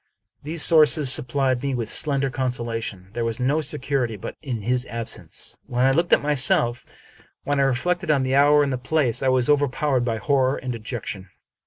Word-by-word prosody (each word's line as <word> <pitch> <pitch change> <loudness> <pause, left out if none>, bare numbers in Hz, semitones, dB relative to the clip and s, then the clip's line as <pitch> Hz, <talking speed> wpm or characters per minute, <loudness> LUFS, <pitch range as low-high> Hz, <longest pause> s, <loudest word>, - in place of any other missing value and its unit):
These 155 +1 -1
sources 155 -4 +5
sup - - -1
plied 130 -1 0
me 140 -1 -2
with 115 -3 -3
slender 140 +1 +1
consolation. 115 -7 -4
There 120 - -2
was 115 -1 -3
no 140 +5 +1
security 140 -5 -2
but - - -7
in 125 -8 -5
his 125 +3 0
absence. 115 -1 -6
When 125 +1 0
I 135 - +4
looked 170 +5 0
at - - +4
myself, 130 -4 +1 0.6
when 145 0 -1
I - - +4
re 135 - +2
flected 175 +5 -2
on 140 -3 +2
the 130 0 -1
hour 145 +1 +5
and 140 -2 -1
the 125 - -3
place, 130 -3 0
I 135 - 0
was 130 -1 +2
overpowered 145 -2 +1
by 115 -2 -1
horror 135 +1 +1
and 125 -1 -4
dejection. 110 -4 -6
130 Hz, 195 wpm, -23 LUFS, 120-145 Hz, 0.6 s, sources